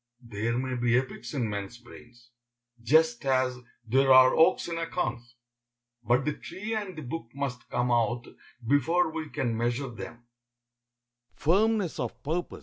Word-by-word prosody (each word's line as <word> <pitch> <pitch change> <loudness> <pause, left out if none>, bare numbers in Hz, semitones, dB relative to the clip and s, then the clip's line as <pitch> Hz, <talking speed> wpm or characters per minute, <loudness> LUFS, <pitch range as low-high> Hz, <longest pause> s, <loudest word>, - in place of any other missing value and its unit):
There 115 +1 -2
may 130 0 -2
be 120 -1 +2
epics 130 +1 -4
in 125 -5 0
men's 100 +2 -5
brains, 120 0 -16 0.5
just 150 0 +3
as 130 -2 +1 0.3
there 135 +4 +3
are 130 0 +8
oaks 170 +3 +4
in 165 -1 -3
acorns, 120 -8 -3 0.7
but 120 +4 +2
the 150 - 0
tree 205 +9 -6
and 205 -5 -4
the 155 - -6
book 135 +1 -5
must 135 -3 -4
come 125 0 0
out 120 0 +1 0.4
before 160 +7 +2
we 160 -1 -5
can 120 -5 -2
measure 120 +4 -1
them. 120 0 -9
125 Hz, 135 wpm, -28 LUFS, 120-150 Hz, 0.7 s, are